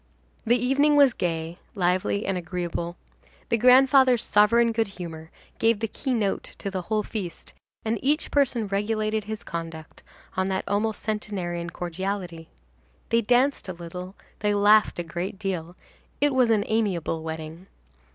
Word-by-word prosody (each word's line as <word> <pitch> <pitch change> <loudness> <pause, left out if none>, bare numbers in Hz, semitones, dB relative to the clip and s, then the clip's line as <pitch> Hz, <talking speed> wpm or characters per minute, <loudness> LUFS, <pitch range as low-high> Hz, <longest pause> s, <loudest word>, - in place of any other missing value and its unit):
The 240 +2 +5
evening 275 +5 +3
was 280 -4 +6
gay, 165 -1 -3 0.2
lively 185 +2 +1
and 195 - 0
agreeable. 175 -1 -4 0.5
The 230 - +3
grandfather's 255 0 +6
sovereign 230 +3 +4
good 225 -1 0
humor 160 -3 -7 0.3
gave 225 -2 +3
the 225 - -1
key 265 +5 -4
note 205 -4 -2
to 200 - -5
the 190 -1 -2
whole 215 +3 -1
feast, 195 -6 -6 0.3
and 220 0 0
each 295 +4 0
person 260 -6 +2
regulated 215 +1 -1
his 220 +2 -5
conduct 165 -2 -7 0.3
on 190 0 0
that 190 -1 -1
almost 210 +1 -1
centenarian 185 -5 -3
cordiality. 175 -1 -4 0.6
They 230 0 +3
danced 245 0 +2
a - - -3
little, 180 +2 -8 0.2
they 205 0 +1
laughed 210 +1 +5
a 175 - -2
great 175 +4 -5
deal; 180 -4 -4 0.4
it 290 -1 +3
was 255 -2 +3
an 215 -2 +3
amiable 190 -8 -1
wedding. 160 +2 -7
205 Hz, 150 wpm, -25 LUFS, 175-230 Hz, 0.6 s, was